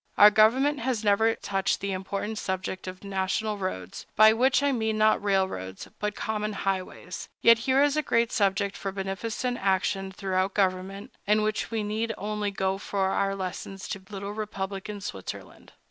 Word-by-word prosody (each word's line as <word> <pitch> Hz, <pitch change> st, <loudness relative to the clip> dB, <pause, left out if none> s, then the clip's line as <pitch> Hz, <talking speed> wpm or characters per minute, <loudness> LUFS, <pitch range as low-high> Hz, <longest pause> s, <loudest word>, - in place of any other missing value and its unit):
Our 210 Hz, +1 st, +9 dB
government 255 Hz, +8 st, +4 dB
has 235 Hz, -2 st, -1 dB
never 220 Hz, +2 st, +3 dB
touched 195 Hz, -1 st, -1 dB
the 200 Hz, 0 st, -3 dB
important 200 Hz, +3 st, -3 dB
subject 190 Hz, 0 st, -3 dB
of 185 Hz, +1 st, -7 dB
national 200 Hz, +2 st, -1 dB
roads, 95 Hz, -, -5 dB
by 215 Hz, +1 st, +8 dB
which 260 Hz, +4 st, +3 dB
I 285 Hz, -, +3 dB
mean 220 Hz, -3 st, 0 dB
not 215 Hz, -1 st, +3 dB
railroads, 190 Hz, -, -1 dB
but 210 Hz, 0 st, -2 dB
common 215 Hz, -1 st, -2 dB
highways; 190 Hz, -2 st, -4 dB
yet 230 Hz, -1 st, +7 dB
here 270 Hz, +2 st, +5 dB
is 290 Hz, 0 st, +2 dB
a 305 Hz, -, +2 dB
great 235 Hz, -4 st, +1 dB
subject 200 Hz, -1 st, +1 dB
for 195 Hz, -, -4 dB
beneficent 210 Hz, +6 st, -3 dB
action 195 Hz, 0 st, +1 dB
through 190 Hz, 0 st, 0 dB
government, 190 Hz, 0 st, -1 dB, 0.2 s
in 210 Hz, +1 st, +4 dB
which 215 Hz, 0 st, -1 dB
we 225 Hz, -2 st, -1 dB
need 220 Hz, +2 st, -2 dB
only 210 Hz, 0 st, -2 dB
go 190 Hz, -1 st, -1 dB
for 195 Hz, -1 st, -1 dB
our 195 Hz, 0 st, 0 dB
lessons 195 Hz, +1 st, -5 dB
to 195 Hz, -, -4 dB
little 200 Hz, 0 st, -5 dB
republican 200 Hz, -1 st, -5 dB
Switzerland. 95 Hz, -, -8 dB
200 Hz, 165 wpm, -27 LUFS, 190-220 Hz, 0.2 s, Our